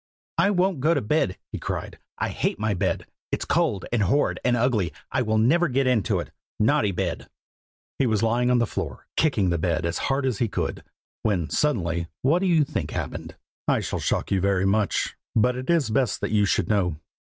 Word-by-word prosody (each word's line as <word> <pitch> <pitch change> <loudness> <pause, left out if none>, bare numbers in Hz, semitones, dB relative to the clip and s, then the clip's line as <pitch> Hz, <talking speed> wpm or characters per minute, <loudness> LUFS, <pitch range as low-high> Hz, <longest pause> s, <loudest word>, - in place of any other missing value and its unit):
'I 200 - +5
won't 185 -4 +1
go 160 +5 +3
to - - +2
bed!' 105 -4 0
he - - -4
cried. - - -5 0.2
'I - - -1
hate - - -1
my 110 0 0
bed! 90 - -1 0.3
it's - - -1
cold, 95 - +1
and 120 - +2
horrid, 110 +10 +2
and 125 -1 +2
ugly. 115 -7 +1 0.2
I - - +1
will 110 -2 +1
never 160 +11 +4
get 135 0 +1
into 120 -7 +2
it! - - -6 0.3
naughty 110 -2 +3
bed!' 90 -2 -3 0.7
"He 135 - +3
was 110 -1 +1
lying 120 +2 +2
on 125 - +4
the 120 - +3
floor, - - -5
kicking 105 - +2
the 85 - 0
bed 85 -1 0
as 85 - -1
hard 135 0 +1
as 125 -6 -1
he 120 - +2
could, 100 - -3 0.4
when 90 -8 0
suddenly 85 - 0 0.2
what 150 +7 +4
do 190 - 0
you 165 -4 +4
think 150 +2 -3
happened? - - -5 0.3
I - - +3
shall - - -3
shock - - -1
you 95 -2 +2
very 95 -1 +2
much, 100 +1 +1 0.2
but 125 +3 +3
it 130 +3 -6
is 165 -9 +2
best 125 +1 +1
that - - -2
you 105 -1 +3
should - - +1
know. 95 -6 +1
115 Hz, 210 wpm, -25 LUFS, 100-135 Hz, 0.7 s, I